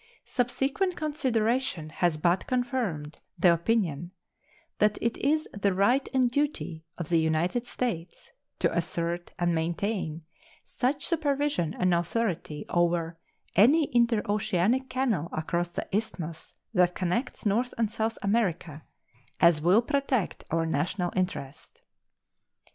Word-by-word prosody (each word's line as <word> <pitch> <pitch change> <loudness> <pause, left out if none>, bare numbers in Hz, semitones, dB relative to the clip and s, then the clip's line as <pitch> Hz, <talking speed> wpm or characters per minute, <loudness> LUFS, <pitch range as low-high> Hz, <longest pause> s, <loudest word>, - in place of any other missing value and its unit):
Subsequent 270 - 0
consideration 250 - 0
has 165 0 0
but 175 +4 +1
confirmed 245 - -2 0.2
the 175 0 +5
opinion 170 -3 0 0.7
"that 210 0 +3
it 235 0 0
is 310 +2 +1
the 200 -2 0
right 245 +8 +2
and 255 -2 +2
duty 285 - -2
of 170 -3 -5
the 170 -1 +4
United 165 +9 0
States 180 -9 -4 0.3
to - - +1
assert 170 +1 -2
and 175 -1 +1
maintain 165 0 -2 0.4
such 275 +3 -1
supervision 290 - 0
and 180 -1 +2
authority 170 -4 -1
over 170 -1 +1 0.4
any 280 - +5
interoceanic 225 +1 +2
canal 235 - 0
across 170 +2 -1
the - - -5
isthmus 170 -7 -4 0.2
that 180 -2 +3
connects 185 +9 -2
North 235 +5 +1
and 225 -2 +1
South 225 +1 -1
America 180 -7 0 0.6
as 170 -3 +5
will 185 +8 +4
protect 275 - -1
our 165 0 +1
national 175 +4 -1
interest." 150 -7 -4
195 Hz, 120 wpm, -28 LUFS, 170-245 Hz, 0.7 s, the